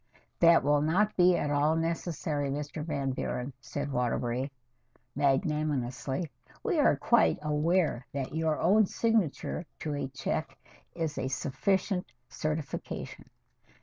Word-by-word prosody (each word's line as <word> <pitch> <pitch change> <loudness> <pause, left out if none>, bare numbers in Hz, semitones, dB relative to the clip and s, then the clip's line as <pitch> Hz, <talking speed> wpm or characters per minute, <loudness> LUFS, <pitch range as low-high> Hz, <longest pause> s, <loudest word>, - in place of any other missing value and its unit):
"That 170 -3 +6
will 145 +1 +3
not 190 +8 +2
be 180 -1 +5
at 145 - -1
all 145 +2 +3
necessary, 165 -3 -1
Mr. 150 +2 -4
Van 140 -4 -1
Buren," 130 +1 -3
said 145 +1 -4
Waterbury 125 +1 -1 0.6
magnanimously. 140 -1 0 0.3
"We - - +1
are - - +5
quite 80 - +3
aware 150 -2 +1
that 135 -1 -4
your 160 -1 +1
own 200 +4 +4
signature 220 -8 0 0.2
to 150 - -2
a 140 -2 -2
check 135 +4 -3 0.4
is 160 -3 -2
a 130 - -1
sufficient 180 - -1 0.2
certification." 155 -2 -4
150 Hz, 120 wpm, -30 LUFS, 135-165 Hz, 0.6 s, That